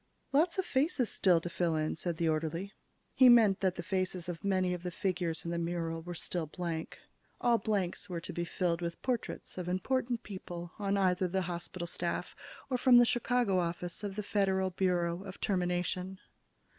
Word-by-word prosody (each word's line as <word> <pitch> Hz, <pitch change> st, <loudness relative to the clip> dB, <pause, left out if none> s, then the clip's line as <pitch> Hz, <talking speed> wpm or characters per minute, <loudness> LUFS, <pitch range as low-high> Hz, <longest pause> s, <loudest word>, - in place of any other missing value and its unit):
"Lot 320 Hz, +7 st, +3 dB
of 380 Hz, -, 0 dB
faces 265 Hz, -3 st, +1 dB
still 180 Hz, -3 st, +4 dB
to 175 Hz, -, -5 dB
fill 170 Hz, -1 st, 0 dB
in," 155 Hz, 0 st, 0 dB
said 170 Hz, 0 st, -2 dB
the 165 Hz, -, +1 dB
orderly. 165 Hz, +5 st, -1 dB, 0.4 s
He 260 Hz, -1 st, +7 dB
meant 220 Hz, -5 st, +6 dB
that 185 Hz, -2 st, +1 dB
the 175 Hz, -, -5 dB
faces 185 Hz, -1 st, -2 dB
of 175 Hz, -2 st, -5 dB
many 185 Hz, -2 st, +1 dB
of 180 Hz, -, -4 dB
the 180 Hz, -, -3 dB
figures 180 Hz, -3 st, -2 dB
in 170 Hz, -, -2 dB
the 170 Hz, -, -1 dB
mural 165 Hz, -1 st, -2 dB
were 175 Hz, +1 st, -6 dB
still 170 Hz, -1 st, -2 dB
blank. 165 Hz, 0 st, -4 dB, 0.4 s
All 235 Hz, -1 st, +3 dB
blanks 205 Hz, -2 st, -1 dB
were 175 Hz, -2 st, -3 dB
to 165 Hz, -, -7 dB
be 175 Hz, -, -2 dB
filled 170 Hz, 0 st, -1 dB
with 170 Hz, -1 st, -3 dB
portraits 245 Hz, -6 st, -3 dB
of 180 Hz, -1 st, -3 dB
important 240 Hz, +5 st, 0 dB
people 175 Hz, -3 st, -7 dB
on 200 Hz, -1 st, +1 dB
either 185 Hz, -1 st, +2 dB
the 190 Hz, +1 st, 0 dB
hospital 175 Hz, 0 st, -5 dB
staff 170 Hz, -, -3 dB, 0.3 s
or 255 Hz, -2 st, -1 dB
from 250 Hz, -1 st, +7 dB
the 240 Hz, -, +8 dB
Chicago 240 Hz, -5 st, +2 dB
Office 175 Hz, +2 st, -3 dB
of 200 Hz, -2 st, -4 dB
the 210 Hz, -, -3 dB
Federal 190 Hz, -2 st, +1 dB
Bureau 175 Hz, -1 st, 0 dB
of 190 Hz, -1 st, -9 dB
Termination. 180 Hz, 0 st, -1 dB
180 Hz, 190 wpm, -32 LUFS, 170-200 Hz, 0.4 s, the